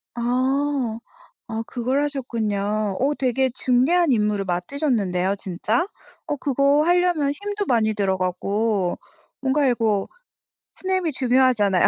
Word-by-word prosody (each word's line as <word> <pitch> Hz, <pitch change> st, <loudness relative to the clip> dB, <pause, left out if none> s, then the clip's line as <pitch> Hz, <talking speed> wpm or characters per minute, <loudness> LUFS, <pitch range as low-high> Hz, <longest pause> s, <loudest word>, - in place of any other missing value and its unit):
아. 255 Hz, 0 st, 0 dB, 0.5 s
아 225 Hz, +1 st, -2 dB
그걸 260 Hz, +4 st, -1 dB
하셨군요. 215 Hz, -7 st, -2 dB
어 280 Hz, +3 st, +2 dB
되게 260 Hz, 0 st, +1 dB
중대한 275 Hz, +6 st, +3 dB
임무를 210 Hz, -3 st, +1 dB
맡으셨는데요 190 Hz, -, 0 dB
진짜? 200 Hz, -, -1 dB, 0.4 s
어 -, -, -1 dB
그거 280 Hz, +1 st, +2 dB
하려면 350 Hz, -5 st, +2 dB
힘도 410 Hz, +5 st, -4 dB
많이 220 Hz, -3 st, +2 dB
들어가고 195 Hz, +1 st, 0 dB, 0.4 s
뭔가 275 Hz, +2 st, +2 dB
이거 225 Hz, -5 st, +1 dB, 0.6 s
스냅이 370 Hz, -4 st, -1 dB
중요하잖아요. 250 Hz, -7 st, +3 dB
245 Hz, 265 characters per minute, -23 LUFS, 210-280 Hz, 0.6 s, 중대한